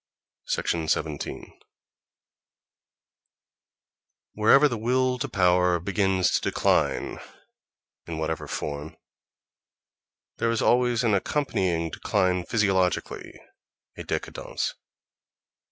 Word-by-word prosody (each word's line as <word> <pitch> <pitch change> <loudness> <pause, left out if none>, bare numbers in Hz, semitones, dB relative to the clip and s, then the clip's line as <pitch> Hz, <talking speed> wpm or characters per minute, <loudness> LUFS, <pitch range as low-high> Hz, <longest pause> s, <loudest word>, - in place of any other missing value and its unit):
17. 80 -2 -2 2.7
Wherever 135 +7 +5
the 120 -5 -3
will 125 +2 +1
to 145 - -3
power 90 -3 +3
begins 95 0 +1
to - - +1
decline, - - 0 0.9
in 85 -2 -5
whatever 80 0 -3
form, 75 +1 -5 1.4
there 115 - 0
is 115 -1 0
always 125 -1 +3
an 115 -3 +2
accompanying 95 - 0
decline 90 -1 0
physiologically, 95 -3 0 0.6
a - - -8
décadence. - - -3
95 Hz, 80 wpm, -26 LUFS, 85-115 Hz, 2.7 s, Wherever